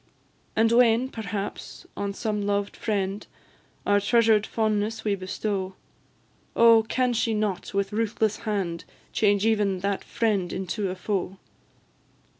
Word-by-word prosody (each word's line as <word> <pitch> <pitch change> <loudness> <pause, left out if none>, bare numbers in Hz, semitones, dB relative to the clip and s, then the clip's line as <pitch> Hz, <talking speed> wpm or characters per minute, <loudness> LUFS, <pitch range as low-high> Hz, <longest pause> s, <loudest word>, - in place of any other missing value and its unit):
And 225 +1 +3
when, 240 +1 +4
perhaps, 205 -4 -6
on 200 -1 -3
some 210 -2 -2
loved 200 0 -1
friend 200 -1 -2 0.6
Our 205 0 +4
treasured 220 0 +3
fondness 215 0 -1
we 210 - +1
bestow, 190 0 -3 0.8
Oh! 230 -1 +7
can 255 -1 +1
she 230 -1 0
not, 210 -3 -2
with 200 0 0
ruthless 220 -1 0
hand, 190 -6 -3 0.3
Change 205 -1 +2
even 205 -4 +1
that 200 0 -1
friend 210 -6 0
into 190 +2 -2
a 185 - -4
foe? 190 0 -3
210 Hz, 125 wpm, -26 LUFS, 195-225 Hz, 0.8 s, Oh